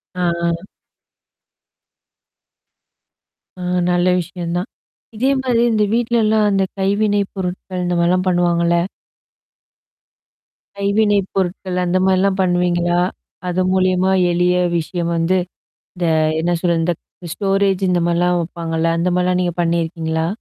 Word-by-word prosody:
ஆஹ், 175 -1 0 0.2
ஹ. 180 - -14 2.9
அ - - -6 0.3
நல்ல 175 +1 +2
விஷயம் 175 0 -5
தான். 180 +7 -3 0.5
இதே 260 +5 +1
மாரி, 245 -3 +1
இந்த 215 -1 +2
வீட்லல்லாம் 220 -2 +2
அந்த 195 -1 +2 0.2
கைவினை 205 +1 +1
பொருட்கள் 185 0 -4
இந்த 175 0 0
மாரிலாம் 180 +2 +2
பண்ணுவாங்கல்ல? 170 -1 +2 2.0
கைவினை 205 +1 +2 0.2
பொருட்கள் 185 -1 -2
அந்த 180 +1 +1
மாரிலாம் 190 +1 +2
பண்ணுவீங்களா? 175 -1 +1 0.5
அது 180 +1 0
மூலியமா 185 0 +2 0.2
எளிய 180 +1 +2 0.2
விஷயம் 170 +1 -3
வந்து 165 +3 +1 0.6
இந்த 175 -1 -4 0.4
என்ன 175 +2 0
சொல்றது! 170 -1 +1 0.2
இந்த 175 - -8
ஸ்டோரேஜ் 195 -1 +1
இந்த 175 - +2
மாரிலாம் 175 +1 +2
வைப்பாங்கல்ல? 165 -1 -2
அந்த 175 - +1
மாரிலாம் 180 0 +1
நீங்க 175 -2 -1
பண்ணியிருக்கீங்களா? 165 -1 -1
180 Hz, 110 wpm, -18 LUFS, 175-195 Hz, 2.9 s, நல்ல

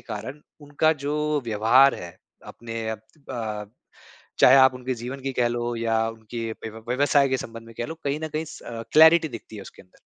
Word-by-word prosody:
कारण 125 +6 -7 0.2
उनका 145 +2 +1
जो 150 0 0
व्यवहार 115 +5 +4
है। 85 -1 -9 0.3
अपने 115 -1 -6
अ, 110 - -3 1.4
चाहे 130 - +7
आप 130 -1 +6
उनके 125 0 -4
जीवन 125 +3 -7
की 135 0 -3
कह 125 -2 +1
लो 120 0 -2
या 115 -1 0
उनके 115 +1 -6
व्य 110 - -8 0.2
व्यवसाय 140 +2 +3
के 130 - +1
संबंध 115 -1 -9
में 115 - -14
कह 120 - -2
लो 160 - -6
कहीं 145 +2 -1
न - - -3
कहीं 155 +1 -3
स - - -11
अ, 115 -1 -7
क्लैरिटी 160 +1 +7
दिखती 115 -3 -10
है 100 - -8
उसके - - -14
अंदर। 90 - -27
125 Hz, 195 wpm, -24 LUFS, 115-145 Hz, 1.4 s, चाहे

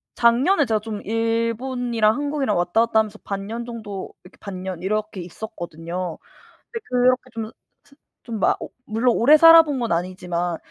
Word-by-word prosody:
작년에 265 +8 +3
제가 220 -3 +1
좀 210 -1 -6
일본이랑 230 +1 0
한국이랑 285 -7 -1
왔다 175 +7 +2
갔다 220 -1 +2
하면서 215 -1 -2
반 195 0 -5
년 230 +2 -5
정도 215 -5 -7
이렇게 180 - -17
반 195 -3 -7
년 185 -2 -5
이렇게 210 -1 -2
있었거든요. 175 -2 -6 0.5
근데 460 -2 -6
그렇게 250 0 +3
좀 225 -1 -4
사 - - -13 0.7
좀 230 -3 -5
막 - - +1
어 - - -8 0.2
물론 230 +3 +1
오래 285 +7 +6
살아본 325 -3 +7
건 235 -5 -2
아니지만 175 -1 -2
220 Hz, 335 characters per minute, -22 LUFS, 190-245 Hz, 0.7 s, 살아본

